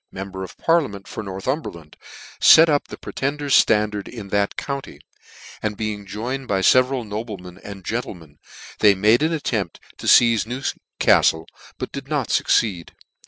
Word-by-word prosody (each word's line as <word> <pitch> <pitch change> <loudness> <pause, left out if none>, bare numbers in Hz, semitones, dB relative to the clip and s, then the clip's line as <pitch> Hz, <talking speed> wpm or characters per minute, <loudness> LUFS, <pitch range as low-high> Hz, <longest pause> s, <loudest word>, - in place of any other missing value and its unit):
member 95 0 -7
of 95 - -10
Parliament 135 - 0
for 100 - -6
Northumberland, 95 - -5 0.6
let 165 +1 +6
up 145 -1 +1
the - - -9
Pretender's 140 0 -3
flandard 105 -2 0
in 105 -5 -9
that 100 0 0
county, 140 -1 -5 0.6
and 105 -1 -3
being 105 -2 -4
joined 125 +6 -5
by 95 -3 0
feveral 130 +2 +3
noble 105 0 -5
men 90 0 -12
and 100 -3 -10
gentlemen, 85 -10 -6 0.4
they 105 -2 +5
made 105 +6 +3
an 160 +2 +1
attempt 110 - -2 0.2
to - - -6
feize 115 -3 +5
Newcaftle, 120 - +1 0.3
but - - -5
did - - -7
not - - -2
fucceed. 95 -7 +1
105 Hz, 150 wpm, -21 LUFS, 95-130 Hz, 0.6 s, let